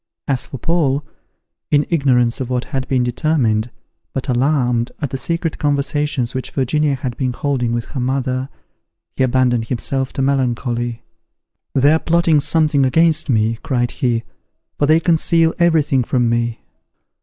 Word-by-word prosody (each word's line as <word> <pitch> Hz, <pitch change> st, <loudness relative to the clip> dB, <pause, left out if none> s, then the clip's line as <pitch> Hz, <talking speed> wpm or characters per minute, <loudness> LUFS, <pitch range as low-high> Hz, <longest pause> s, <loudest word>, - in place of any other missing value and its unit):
As 135 Hz, -3 st, -1 dB
for 135 Hz, -, -7 dB
Paul, 145 Hz, -1 st, 0 dB, 0.6 s
in 145 Hz, 0 st, +3 dB
ignorance 125 Hz, -6 st, +2 dB
of 125 Hz, -, -4 dB
what 125 Hz, -1 st, -1 dB
had 135 Hz, -2 st, -4 dB
been 130 Hz, -2 st, +1 dB
determined, 120 Hz, -3 st, 0 dB, 0.4 s
but 135 Hz, -, -4 dB
alarmed 125 Hz, -2 st, +1 dB
at 145 Hz, -3 st, -3 dB
the 135 Hz, -, -2 dB
secret 165 Hz, +4 st, -2 dB
conversations 145 Hz, -3 st, -1 dB
which 130 Hz, -1 st, -3 dB
Virginia 145 Hz, +2 st, 0 dB
had 130 Hz, -2 st, -4 dB
been 130 Hz, -2 st, -1 dB
holding 130 Hz, -3 st, -1 dB
with 120 Hz, -1 st, -2 dB
her 135 Hz, -, -5 dB
mother, 130 Hz, +1 st, -1 dB, 0.7 s
he -, -, -2 dB
abandoned 125 Hz, -2 st, +2 dB
himself 130 Hz, +2 st, -2 dB
to 135 Hz, -, -1 dB
melancholy. 120 Hz, -3 st, -1 dB, 0.7 s
"They 140 Hz, +3 st, +5 dB
are 160 Hz, -, +3 dB
plotting 170 Hz, -2 st, +2 dB
something 150 Hz, -1 st, +2 dB
against 160 Hz, +4 st, +3 dB
me," 110 Hz, -1 st, +1 dB
cried 120 Hz, -2 st, -1 dB
he, 120 Hz, -5 st, -1 dB, 0.6 s
"for 145 Hz, -, +2 dB
they 155 Hz, +2 st, +5 dB
conceal 165 Hz, 0 st, +2 dB
every 165 Hz, -3 st, +4 dB
thing 135 Hz, -3 st, +1 dB
from 120 Hz, 0 st, +1 dB
me." 120 Hz, -1 st, -1 dB
135 Hz, 155 wpm, -18 LUFS, 125-150 Hz, 0.7 s, They